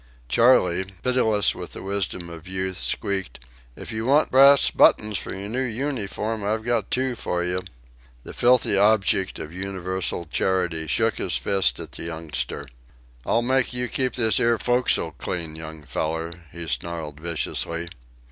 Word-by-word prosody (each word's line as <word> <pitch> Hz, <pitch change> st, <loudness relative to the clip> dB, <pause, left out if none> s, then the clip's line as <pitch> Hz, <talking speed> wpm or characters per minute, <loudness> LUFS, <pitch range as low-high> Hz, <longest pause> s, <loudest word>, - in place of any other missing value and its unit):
Charley, 95 Hz, -, +4 dB, 0.2 s
pitiless 115 Hz, -5 st, +2 dB
with -, -, -8 dB
the -, -, -8 dB
wisdom 95 Hz, -3 st, -3 dB
of 85 Hz, -1 st, -10 dB
youth, 95 Hz, 0 st, -3 dB
squeaked: 95 Hz, -1 st, -2 dB, 0.4 s
"If -, -, -8 dB
you 110 Hz, 0 st, -3 dB
want 140 Hz, +5 st, +3 dB
brass 140 Hz, +2 st, +7 dB
buttons 105 Hz, -2 st, +4 dB
for -, -, -7 dB
your 95 Hz, +1 st, -5 dB
new 125 Hz, +3 st, -1 dB, 0.2 s
unyforms 110 Hz, -3 st, -3 dB
I've 110 Hz, +2 st, -1 dB
got 115 Hz, -3 st, 0 dB
two 130 Hz, 0 st, 0 dB
for 90 Hz, -5 st, -2 dB
you." 90 Hz, +1 st, -1 dB, 0.6 s
The -, -, -9 dB
filthy 120 Hz, -4 st, +3 dB
object 100 Hz, -2 st, +3 dB
of 80 Hz, +1 st, -7 dB
universal 95 Hz, -2 st, -3 dB
charity 90 Hz, -1 st, -1 dB
shook -, -, +1 dB
his -, -, 0 dB
fist 95 Hz, -1 st, +1 dB
at -, -, -7 dB
the -, -, -8 dB
youngster. 80 Hz, -3 st, -4 dB, 0.6 s
"I'll 120 Hz, -, +2 dB
make 130 Hz, 0 st, +1 dB
you 125 Hz, 0 st, -1 dB
keep 130 Hz, +1 st, -1 dB
this 110 Hz, -6 st, +4 dB
'ere 115 Hz, 0 st, +3 dB
fo'c'sle 120 Hz, -6 st, +1 dB
clean, 80 Hz, 0 st, -4 dB
young 80 Hz, -1 st, -8 dB
feller," 80 Hz, +3 st, -3 dB, 0.2 s
he 85 Hz, 0 st, -7 dB
snarled 80 Hz, -2 st, -4 dB
viciously. 85 Hz, +1 st, -2 dB
95 Hz, 155 wpm, -24 LUFS, 85-115 Hz, 0.6 s, brass